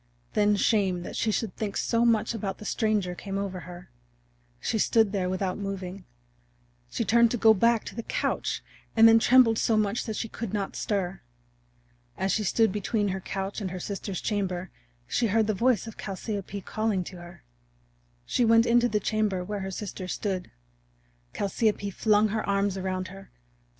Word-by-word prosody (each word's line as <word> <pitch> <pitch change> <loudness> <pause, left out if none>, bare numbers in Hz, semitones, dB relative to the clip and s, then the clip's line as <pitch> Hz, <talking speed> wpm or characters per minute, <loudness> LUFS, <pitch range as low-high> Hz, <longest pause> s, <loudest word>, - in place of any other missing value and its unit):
Then 210 0 +3
shame 195 -4 +1
that - - -7
she 225 - 0
should 215 -2 -2
think 210 -2 -3
so 230 0 +1
much 225 -1 +2
about 200 -3 -4
the 210 - -10
stranger 210 -5 0
came 195 +2 -5
over 195 -2 -3
her. 180 0 -11 0.7
She 220 - -1
stood 220 -1 +3
there 190 -3 -1
without 185 +1 -2
moving; 195 -1 -5 0.8
she - - -2
turned 235 0 +5
to 245 - -1
go 220 0 +6
back 230 +2 +3
to - - -7
the 230 - -4
couch, - - -2 0.3
and 225 0 +8
then 225 0 +7
trembled 235 -2 +5
so 225 - +2
much 215 +1 0
that 220 - -4
she 225 - -3
could 225 -2 -6
not 200 -2 -3
stir. 195 -4 -2 1.0
As 190 - 0
she 215 - +1
stood 220 +2 +3
between 205 +1 -1
her 190 0 -2
couch 195 +3 -4
and 190 - -2
her 185 0 -5
sister's 195 0 -4
chamber 190 -3 -2 0.3
she 230 - 0
heard 220 +2 +2
the 215 - 0
voice 235 +3 +2
of 225 - -10
Chalciope 200 0 -5
calling 215 -4 -1
to 180 +1 -9
her. 175 0 -12 0.8
She 245 - +1
went 230 0 +5
into 240 +1 +4
the 210 - +1
chamber 205 -3 0
where 205 +2 -4
her 190 0 -4
sister 190 -1 -6
stood. 185 0 -3 0.9
Chalciope 205 0 0
flung 215 +1 +3
her 215 +1 -1
arms 200 -1 +1
around 185 -1 -3
her. 195 +1 -12
205 Hz, 180 wpm, -27 LUFS, 190-220 Hz, 1.0 s, and